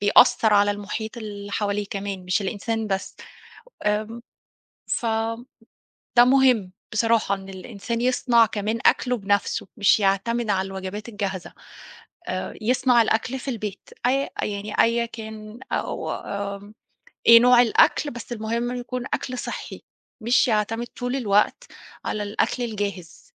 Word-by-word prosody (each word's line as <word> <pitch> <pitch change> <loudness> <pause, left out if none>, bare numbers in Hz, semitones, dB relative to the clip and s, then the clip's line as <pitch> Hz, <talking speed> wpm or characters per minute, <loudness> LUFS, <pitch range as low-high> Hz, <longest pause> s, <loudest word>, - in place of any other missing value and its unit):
بيأثِّر 205 +1 +5
على 205 0 +5
المحيط 210 +3 -5
اللي 205 -2 -7
حواليه 205 -1 -1
كمان، 195 -2 -4
مش 185 +3 0
الإنسان 220 +3 -2
بس. 195 -1 -3 0.7
آمم، 215 +3 -1 0.7
فده 225 +1 -1 0.8
مهم 250 -7 +4 0.2
بصراحة، 225 -2 +2
إن 195 0 -11
الإنسان 200 +5 -5
يصنع 245 -2 +4
كمان 215 +1 -2
أكله 250 -1 +3
بنفسه، 200 -1 0
مش 205 +1 +4
يعتمد 210 +4 +1
على 190 -1 0
الوجبات 195 +4 -6
الجاهزة. 195 -4 -4 0.7
آآ، - - -3
يصنع 250 +1 +3
الأكل 245 +4 -1
في 275 - -11
البيت، 210 -4 -6 0.2
أي 275 +2 +1
يعني 205 0 -4
أي 235 0 +1
كان 220 0 -9
أو - - -2
آمم، 200 +1 -6 0.5
إيه 230 0 +10
نوع 245 0 +7
الأكل، 285 +5 +3
بس 240 0 -8
المهم 235 +2 -2
يكون 245 0 -4
أكل 255 -1 -4
صحّي، - - -6 0.4
مش 240 +3 +3
يعتمد 225 +2 0
طول 245 +2 -4
الوقت 210 - +2 0.4
على 210 - -2
الأكل 215 +4 -1
الجاهز. 200 -6 -5
220 Hz, 130 wpm, -24 LUFS, 200-235 Hz, 0.8 s, إيه